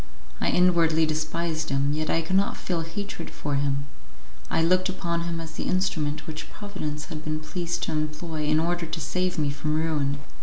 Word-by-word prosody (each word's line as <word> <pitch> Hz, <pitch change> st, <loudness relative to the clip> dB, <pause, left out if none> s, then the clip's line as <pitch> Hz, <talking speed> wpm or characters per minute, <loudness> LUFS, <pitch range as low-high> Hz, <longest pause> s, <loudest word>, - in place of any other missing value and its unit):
I -, -, +2 dB
inwardly 165 Hz, -3 st, +5 dB
despised 160 Hz, +1 st, -1 dB
him, 140 Hz, +1 st, +2 dB
yet 155 Hz, 0 st, -1 dB
I 165 Hz, -, +2 dB
could 185 Hz, +4 st, 0 dB
not 195 Hz, +1 st, +3 dB
feel 175 Hz, -3 st, -1 dB
hatred 175 Hz, +2 st, -5 dB
for 145 Hz, -, -3 dB
him; 140 Hz, 0 st, +1 dB, 0.6 s
I 165 Hz, -, +3 dB
looked 185 Hz, +3 st, +4 dB
upon 170 Hz, -2 st, -1 dB
him 170 Hz, -1 st, -2 dB
as 165 Hz, -1 st, -6 dB
the -, -, -4 dB
instrument 160 Hz, -5 st, 0 dB
which 155 Hz, -1 st, -6 dB
Providence 155 Hz, -8 st, -4 dB
had 155 Hz, -3 st, -6 dB
been 155 Hz, 0 st, -1 dB
pleased 170 Hz, +2 st, -2 dB
to -, -, 0 dB
employ 155 Hz, +1 st, -2 dB
in 155 Hz, +1 st, +4 dB
order 170 Hz, +1 st, 0 dB
to 160 Hz, +1 st, -3 dB
save 180 Hz, +4 st, 0 dB
me 150 Hz, -2 st, +2 dB
from 150 Hz, +2 st, -1 dB
ruin. 150 Hz, -3 st, +1 dB
160 Hz, 190 wpm, -27 LUFS, 155-170 Hz, 0.6 s, inwardly